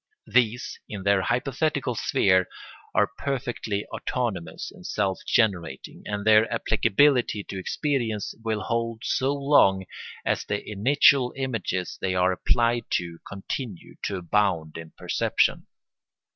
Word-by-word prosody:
These, 125 0 +1
in 100 -3 -6
their 100 -1 +3
hypothetical 135 - 0
sphere, 95 -4 +2 0.5
are 105 +1 +3
perfectly 120 -6 -2
autonomous 100 -10 -3
and - - -15
self 95 -2 -1
generating, 90 - 0
and 105 0 -3
their 110 0 +5
applicability 120 0 +2
to 95 - -6
experience 115 - -2
will 110 -2 -1
hold 115 0 -2
so 135 +1 +1
long 140 -10 +3 0.4
as - - 0
the 105 - -4
initial 125 +4 +4
images 110 -9 -3
they 95 -1 0
are 90 0 +3
applied 115 +5 +1
to 85 -1 -2
continue 100 0 -6
to 100 - -2
abound 90 -3 0
in 80 -1 -8
perception. - - 0
110 Hz, 120 wpm, -25 LUFS, 95-125 Hz, 0.5 s, their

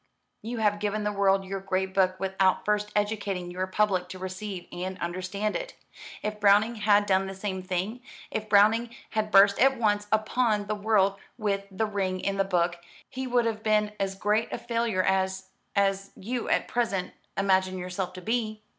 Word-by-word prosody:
"You 230 +3 -5
have 210 -2 +1
given 210 +1 -1
the 210 - 0
world 195 -1 +2
your 195 +1 -4
great 190 0 -2
book 185 -1 +2
without 190 -1 +1
first 210 0 0
educating 205 -4 -1
your 185 +1 -2
public 185 -2 +1
to 185 - -7
receive 185 0 -6
and 185 +1 -5
understand 185 +4 -3
it. - - -4 0.5
If 210 0 -3
Browning 210 +3 +4
had 205 0 +4
done 190 -1 +2
the 195 - -6
same 190 -1 -4
thing 185 +6 -3 0.3
if 215 0 -3
Browning 220 +3 +4 0.2
had 215 -1 -1
burst 200 0 +6
at 270 +1 +4
once 205 -2 +1
upon 215 -1 +1
the 210 - -2
world 200 -2 +2 0.2
with 200 -3 -1
'The 200 +3 -1
Ring 190 -3 -2
and 195 0 -1
the - - +5
Book' 175 -2 0 0.3
he 260 0 -5
would 245 -1 +2
have 220 -2 -1
been 215 -1 +2
as 195 -1 -1
great 210 +3 0
a - - -2
failure 230 -5 0
as 190 0 0 0.3
as 195 -1 +1
you 235 +4 -4
at - - +1
present 210 -6 -1 0.2
imagine 190 -1 +2
yourself 180 0 -4
to 185 -1 -9
be. 215 -1 -2
200 Hz, 180 wpm, -27 LUFS, 190-215 Hz, 0.5 s, burst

